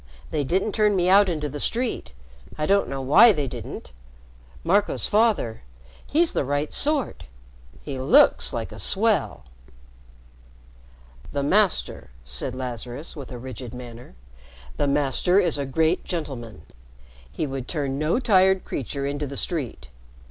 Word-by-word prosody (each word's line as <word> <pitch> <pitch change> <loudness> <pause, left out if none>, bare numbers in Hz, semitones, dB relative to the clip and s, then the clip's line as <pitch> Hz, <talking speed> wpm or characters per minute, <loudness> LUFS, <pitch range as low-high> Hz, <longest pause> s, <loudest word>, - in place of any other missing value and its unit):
They 150 -2 0
didn't 190 +9 0
turn 210 -1 +2
me 180 -1 +2
into 180 -7 +3
the 145 +1 -6
street. 235 - -2 0.5
I 150 - -1
don't 200 +4 +2
know 135 -1 -4
why 150 - +7
they 150 -8 -2
didn't. - - -8 0.7
Marco's 200 +5 +1
father 210 - +1 0.5
he's 325 +3 +2
the - - 0
right 145 +2 -2
sort. 295 -2 +2 0.6
He 135 -3 -5
looks 215 - +4
like - - -4
a - - -10
swell." 190 - 0 1.9
"The 140 - -1
Master," 185 - +1
said 60 - -1
Lazarus, 125 +4 -5
with 140 -4 -9
a 125 - -6
rigid 125 -1 -8
manner, 120 - -11 0.6
"the 145 - 0
Master 145 +6 +2
is 170 -7 +1
a 140 - -3
great 160 +6 +1
gentleman. 125 - -6 0.7
He 155 - -3
would 135 -3 -5
turn 140 -4 -3
no 155 +10 +1
tired 190 -6 +3
creature 140 +2 -4
into 145 +1 -3
the 140 0 -5
street. 130 - -4
145 Hz, 140 wpm, -24 LUFS, 130-190 Hz, 1.9 s, why